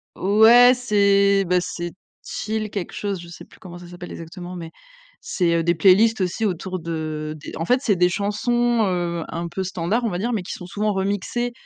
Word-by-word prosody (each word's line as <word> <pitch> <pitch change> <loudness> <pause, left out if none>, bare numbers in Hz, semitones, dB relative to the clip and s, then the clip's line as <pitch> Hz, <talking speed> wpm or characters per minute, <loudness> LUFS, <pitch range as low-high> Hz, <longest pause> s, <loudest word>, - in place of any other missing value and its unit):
Ouais, 225 +5 +6
c'est, 200 -4 +3
bah, 180 +1 +2
c'est 175 -1 -5 0.3
chill, 215 0 -4
quelque 200 -3 -5
chose, 200 -3 -3
je 175 - -10
sais 170 - -11
plus - - -19
comment 175 -2 -10
ça 175 - -12
s'appelle 175 0 -10
exactement 175 +2 -8
mais 165 -2 -8 0.5
c'est, 170 -3 0
heu, - - +1
des 170 +1 +2
playlists 195 +6 +4
aussi 185 +5 -1
autour 185 0 -3
de 155 -2 -4
des 150 - -10
en 165 - -3
fait 250 +5 +2
c'est 205 -7 +2
des 180 0 +4
chansons, 225 +4 0
heu, 175 -2 -2
un 170 +1 -5
peu 190 +2 -4
standards 190 +5 -1
on 225 - +1
va 175 - -3
dire 235 +6 -2
mais 220 - -1
qui 180 - -7
sont 180 - -9
souvent 210 +2 -1
remixées 205 +5 -2
190 Hz, 205 wpm, -22 LUFS, 175-215 Hz, 0.5 s, Ouais